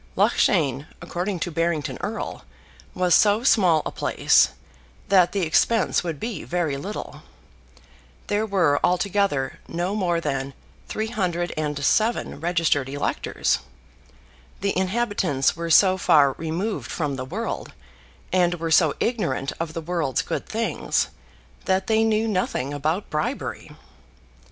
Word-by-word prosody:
Loughshane, 145 -6 +2
according 175 +2 -3
to 175 - -2
Barrington 165 -2 -1
Erle, - - -4 0.5
was 180 -1 +2
so 210 +2 +4
small 180 - +4
a - - -3
place, - - +3 0.6
that 185 -3 +5
the 200 - -1
expense 200 +8 +2
would 165 -5 -4
be 225 -8 -4
very 170 -5 -1
little. 195 +10 -6 1.0
There 210 +2 0
were 180 -8 +2
altogether 180 -6 +1
no 175 +3 -2
more 180 -5 0
than 135 -3 -3 0.3
307 175 -3 -1
registered 165 -5 +1
electors. 145 +1 -1 1.0
The 200 0 0
inhabitants 190 - 0
were 170 +1 -4
so 190 +3 +5
far 145 -5 +5
removed 165 +9 -3
from 150 -4 -2
the 130 - -4
world, 130 - -4 0.6
and 175 -1 +3
were 165 -1 -4
so 160 -2 +4
ignorant 175 - -1
of 165 -1 -3
the 165 - -3
world's 165 -5 -1
good - - -4
things, - - -1 0.6
that 190 0 +1
they 220 0 +2
knew 220 0 +1
nothing 180 - -1
about 155 +7 -2
bribery. 155 0 -3
175 Hz, 120 wpm, -24 LUFS, 150-200 Hz, 1.0 s, that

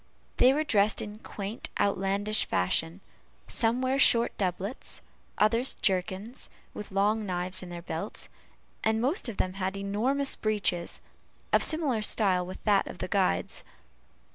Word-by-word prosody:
They 255 - +7
were 300 +3 +1
dressed 210 -8 +2
in 210 0 -5
quaint 205 +1 -6
outlandish 200 +2 +1
fashion; 165 - 0 0.5
some 235 +2 +2
wore 260 +1 +1
short 235 -3 +5
doublets, 190 +4 -3 0.4
others 230 +5 +3
jerkins, 190 +5 -2 0.2
with 210 - -7
long 205 +3 +2
knives 185 -1 -1
in 180 - -8
their 175 -1 -7
belts, 170 +5 -5 0.6
and 220 0 +2
most 265 - 0
of 220 - -7
them 185 - 0
had 190 +1 -1
enormous 235 +8 0
breeches, 205 -5 -1 0.5
of - - +6
similar 295 -8 +1
style 195 -4 +2
with 185 - -9
that 205 -2 +3
of - - -7
the 185 - -4
guide's. 185 - 0
205 Hz, 140 wpm, -29 LUFS, 185-230 Hz, 0.6 s, They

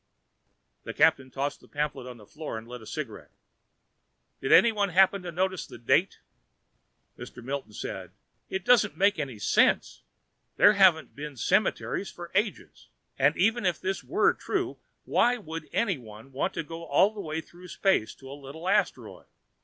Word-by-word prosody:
The - - -7
captain 130 -1 +3
tossed 140 +2 -3
the - - -19
pamphlet 145 -3 -3
to 125 - -7
the 105 - -15
floor 150 0 -7
and 110 +1 -9
lit 125 0 -9
a 110 - -12
cigarette. - - -6 1.1
"Did 135 - -2
anyone 210 -4 +5
happen 190 +2 +4
to 175 -1 -6
notice 185 +2 -1
the - - -11
date?" 115 - +1 1.0
Mr. - - -10
Milton 135 -4 -5
said, - - -6 0.4
"It 190 -1 -4
doesn't 230 -11 +4
make 200 0 +3
any 135 -6 -4
sense! 105 - +2 0.6
There 205 - +7
haven't 185 -6 +4
been 145 -1 -7
cemeteries - - 0
for - - -10
ages. - - -2 0.3
And 140 +3 +3
even 220 +5 +2
if 180 -4 0
this 190 +1 -3
were 415 +5 +2
true, - - -3 0.3
why 245 +1 +3
should 165 -8 -8
anyone 130 - -3
want 135 +8 -2
to 165 - -2
go 165 +2 -8
all 180 +7 +3
the 210 - -6
way 155 -2 -4
through 175 +3 -13
space 190 - 0
to 135 0 -12
a - - -6
little 145 +5 -9
asteroid? - - -1
160 Hz, 165 wpm, -27 LUFS, 135-190 Hz, 1.1 s, There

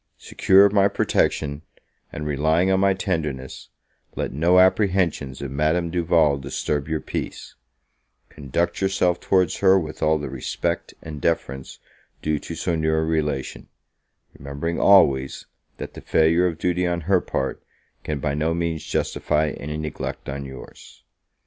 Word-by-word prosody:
Secure 95 +1 +4
of 100 - +2
my 100 -1 +5
protection, 75 -6 0 0.5
and 75 - -6
relying 80 +5 +1
on 95 - +3
my 100 0 +3
tenderness, 75 -9 -4 0.5
let - - -3
no 85 +6 +3
apprehensions 90 -8 +2
of 70 - -5
Madame 80 +4 0
Duval 80 -5 +2
disturb 70 +1 -3
your 80 -1 -1
peace: - - -6 0.7
conduct 80 +6 -3
yourself 90 -2 +1
towards 90 -4 +1
her 95 -1 +5
with 80 -4 -4
all 80 0 +3
the 75 - -5
respect 65 -2 -3
and 75 -2 -8
deference 70 -5 -2 0.5
due 75 -1 0
to - - -7
so 85 - -1
near 80 0 +1
a 80 - 0
relation, 75 -4 -2 0.7
remembering 70 +5 -4
always, 70 -9 +4 0.3
that - - -7
the - - -10
failure 85 +3 +3
of 85 -3 -3
duty 90 +1 0
on 85 0 -1
her 90 +2 +2
part, 65 - -3 0.4
can 75 - -3
by 70 0 -2
no 80 +3 0
means 85 -2 -2
justify 75 +1 0
any 75 +2 -6
neglect 75 -1 -5
on 70 +1 -5
your's. 65 -2 -12
80 Hz, 150 wpm, -23 LUFS, 70-90 Hz, 0.7 s, my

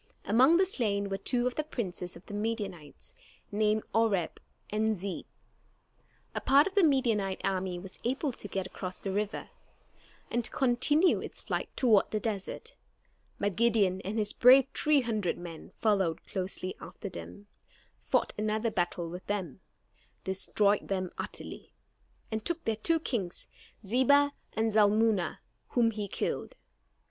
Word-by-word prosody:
Among 260 - +5
the 380 - +4
slain 205 - 0
were 195 0 -2
two 245 +4 +1
of 250 - +1
the 305 - -1
princes 185 -11 -4
of 170 - -13
the - - -9
Midianites, 205 -8 -4 0.4
named 215 +1 +2
Oreb 210 -7 +1 0.3
and 215 0 +1
Zeeb. 190 +1 -4 1.1
A - - -3
part 275 +2 +6
of 390 - -3
the 400 -2 +4
Midianite 230 - +2
army 185 -2 -1
was 185 +1 -10
able 265 +4 0
to 220 - -7
get 190 -1 -3
across 185 0 -6
the 195 - -3
river, 205 +2 -3 0.8
and 240 - +1
to - - -2
continue 270 +7 +3
its - - -6
flight - - -2
toward 225 -6 +4
the 215 - -1
desert; 205 -3 -4 0.6
but 200 -2 0
Gideon 210 -5 +3
and 200 +4 -4
his 210 -1 0
brave 255 +2 +7
three 300 -2 +3
hundred 215 -7 -1
men 170 -2 -9
followed 195 -7 +1
closely 185 0 -4
after - - -8
them, 200 +2 -9 0.5
fought - - 0
another 215 +2 0
battle 175 -2 -1
with 180 +2 -8
them, 190 -8 -3 0.6
destroyed 200 +2 +1
them 185 -2 -2
utterly, - - -7 0.6
and 220 -1 -2
took 340 +4 -2
their 225 - 0
two 325 +10 +2
kings, 210 - -3 0.4
Zebah 285 +6 +4 0.2
and 220 0 +1
Zalmunna, 210 -3 +3 0.3
whom 235 -2 +2
he 210 -2 -4
killed. - - -3
210 Hz, 150 wpm, -30 LUFS, 190-240 Hz, 1.1 s, brave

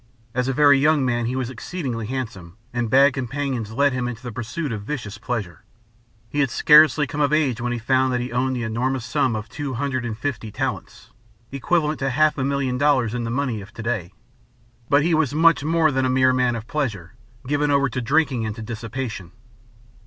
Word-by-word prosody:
As 125 +1 0
a - - +1
very 145 0 +5
young 150 -1 +3
man 120 -2 0
he 125 - -2
was 130 -1 -2
exceedingly 125 -4 -5
handsome, 110 -9 -6 0.2
and 120 -2 -1
bad 135 +3 +5
companions 130 -3 -3
led 140 +4 +2
him 125 -1 -2
into 125 0 -7
the 125 - -5
pursuit 120 +7 -4
of 105 -3 -4
vicious 115 -3 -6
pleasure. 100 -10 -4 0.6
He 145 - -4
had 140 -2 +2
scarcely 150 +2 +6
come 145 +2 -4
of 145 - +2
age 140 -7 +1
when 120 0 -1
he 120 - -1
found 130 +3 +1
that 125 - 0
he 125 +1 -4
owed 130 +2 0
the 120 - -3
enormous 125 +3 -2
sum 115 0 0
of 110 +1 -5
two 140 +1 -5
hundred 130 0 -2
and 110 -3 -4
fifty 120 -4 -4
talents, - - -5 0.4
equivalent 150 +2 0
to 135 0 0
half 155 +4 +3
a - - 0
million 135 -2 -1
dollars 135 -6 +2
in 120 -1 -2
the - - -3
money 125 -3 -2
of 100 +2 -13
to 115 - -7
day. 110 -7 -2 0.8
But 145 +1 +4
he 170 +1 +1
was 155 -3 +1
much 165 -1 +4
more 160 0 +2
than 130 -1 +1
a - - -1
mere 130 0 +3
man 125 -2 +1
of 115 -1 -6
pleasure, 110 - -3 0.3
given 145 +2 0
over 140 -1 +3
to 130 +2 -3
drinking 140 -1 +1
and 110 -1 -3
to 115 - -7
dissipation. 110 -5 -6
130 Hz, 210 wpm, -22 LUFS, 115-140 Hz, 0.8 s, scarcely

